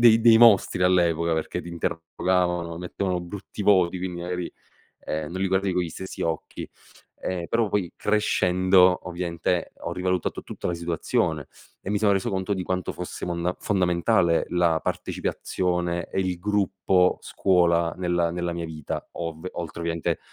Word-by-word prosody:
dei 115 -2 +7
dei 115 -1 +7
mostri 110 -5 +5
all'epoca, 85 -2 +3
perché 80 - -2
ti - - -9
interrogavano, 85 0 -1
mettevano 90 0 -2
brutti 95 +3 -7
voti, 95 -3 +4
quindi, 90 -1 -4
magari, 90 0 -4 0.5
ehm, 75 -1 -4
non 95 - -4
li 95 - +1
guardi 95 +1 +1
con 90 - +1
gli 85 - -3
stessi 95 +4 -7
occhi. 80 -2 -3 0.5
Ehm, 90 -2 -3
però 115 -2 +1
poi 95 -5 0
crescendo, 95 -3 +3
ovviamente, 85 0 -2
ho 85 - -4
rivalutato 90 0 -1
tutta - - -6
la 90 - 0
situazione 85 -2 -1 0.3
e - - -8
mi 105 - +1
sono 105 -1 +3
reso 95 +3 0
conto 95 +1 -1
di 95 - -3
quanto 90 0 -2
fosse 90 - -6
monda 85 +1 -1
fondamentale 85 -3 +2
la 85 -2 +2
partecipazione 90 -1 -2
e - - 0
il 90 -2 -1
gruppo 95 -2 +2
scuola 85 -3 +2
nella 85 -2 0
nella 85 0 -2
mia 85 -1 -4
vita, 75 -3 -6
ov 85 0 -5
oltre 85 -1 -6
ovviamente 85 -1 -1
90 Hz, 155 wpm, -25 LUFS, 85-95 Hz, 0.5 s, dei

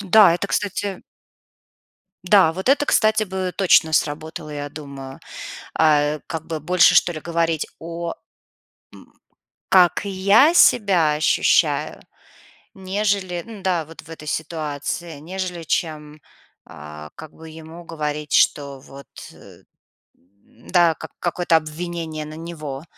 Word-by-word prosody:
Да, 200 -2 +6
это, 175 +3 -3
кстати 200 -1 -2 1.2
Да, 180 -3 +5
вот 190 +8 -4
это, 285 +1 +4
кстати, 220 -5 +3
бы 190 -2 -3
точно 170 -4 +4
сработало, 155 +1 -2
я 145 -1 -5
думаю. 140 -3 -10 0.6
А, 150 -1 +3
как 160 -1 -5
бы 160 -1 -4
больше 180 +3 +4
что 175 - +4
ли 155 - -6
говорить 165 -1 -1
о 170 +1 -5 0.8
м - - -17 0.6
Как 180 -2 +5
я 200 - +4
себя 190 - +4
ощущаю, 150 +1 +1 0.7
нежели 190 -2 -2
Н-да, 190 -7 -2
вот 165 +2 -12
в - - -19
этой 160 -2 -10
ситуации, 155 +1 -4
нежели 180 +1 -5
чем 155 -2 -3 0.4
а, 75 +1 -11
как 155 - -11
бы 160 0 -12
ему 160 +2 -11
говорить, 150 -2 -4
что 140 -2 +2
вот, 135 +1 -14 0.3
э - - -17 0.5
Да, 120 - -1
как - - -10
какое-то 175 -1 +1
обвинение 160 0 -4
на 155 - -9
него. 155 -4 -7
165 Hz, 125 wpm, -21 LUFS, 150-185 Hz, 1.2 s, Да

